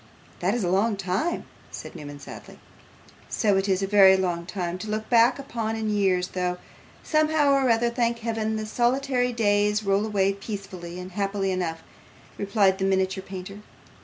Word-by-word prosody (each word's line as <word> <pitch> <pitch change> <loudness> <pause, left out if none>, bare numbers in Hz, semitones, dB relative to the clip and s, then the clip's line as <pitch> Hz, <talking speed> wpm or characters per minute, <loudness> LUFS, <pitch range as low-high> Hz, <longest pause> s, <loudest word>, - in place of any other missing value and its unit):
'That 190 +5 +1
is 240 - -1
a - - 0
long 200 +4 +2
time,' 195 - -1 0.2
said - - -8
Newman, 145 -1 -8
sadly. - - -11 0.7
'So 205 -3 +2
it 195 +1 0
is 190 0 +1
a - - +2
very 195 -1 +6
long 175 -2 -2
time 180 -2 -3
to 215 - -6
look 215 +1 -3
back 240 +1 +5
upon 230 -5 -3
in 220 -1 -2
years, 190 -3 +1
though, 180 -1 -2 0.5
somehow 310 -2 +2
or 270 -2 +3
other, 235 +1 +2
thank 235 -1 0
Heaven, 220 -1 -2
the 215 0 -3
solitary 250 +2 +1
days 210 -2 +2
roll 195 0 +2
away 200 -2 +1
peacefully 195 -4 -7
and 180 +1 -8
happily 195 0 -1
enough,' 170 -3 -3 0.6
replied 200 -1 +2
the 190 - 0
miniature 190 0 0
painter. 190 +1 -8
200 Hz, 170 wpm, -25 LUFS, 190-230 Hz, 0.7 s, very